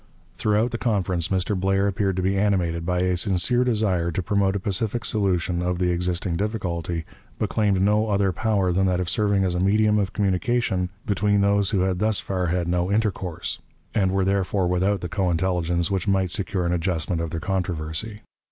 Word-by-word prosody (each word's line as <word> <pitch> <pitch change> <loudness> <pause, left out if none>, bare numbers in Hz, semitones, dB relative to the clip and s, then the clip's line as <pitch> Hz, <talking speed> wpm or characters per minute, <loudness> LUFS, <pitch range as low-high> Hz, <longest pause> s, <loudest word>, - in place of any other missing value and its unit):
Throughout 110 +3 +1
the 115 - -4
conference 95 -7 0
Mr. 95 +2 0
Blair 95 +1 +1
appeared 100 -1 0
to 95 - -1
be 95 +1 +1
animated 90 -5 0
by 90 0 +1
a 90 0 +1
sincere 100 +7 +1
desire 105 -8 +1
to 90 +3 -2
promote 100 0 +1
a - - 0
pacific 110 +4 -1
solution 90 -4 0
of 90 0 -1
the 90 0 +1
existing 90 0 -1
difficulty, 90 -5 -3 0.3
but - - -2
claimed 100 -3 +2
no 105 +3 +2
other 100 -2 +2
power 100 -1 0
than 95 +2 +2
that 90 -1 +1
of 90 -1 -2
serving 100 -2 +2
as 90 -2 0
a 90 - -1
medium 105 +2 +3
of 100 -1 -1
communication 100 -1 0 0.2
between 100 0 +2
those 100 0 +2
who 100 -4 +1
had 95 -1 0
thus 110 0 +1
far 90 -2 -2
had 85 0 -1
no 90 +2 0
intercourse, 100 -5 -1 0.3
and 95 -3 +2
were 95 0 +1
therefore 95 0 +1
without 95 +3 +1
the 90 - -3
co 95 0 -1
intelligence 85 0 0
which 95 0 -1
might 95 -2 +1
secure 95 -1 -1
an 85 - 0
adjustment 85 -1 -1
of 85 - -3
their 85 - -4
controversy. 90 +4 -3
95 Hz, 195 wpm, -24 LUFS, 90-100 Hz, 0.3 s, medium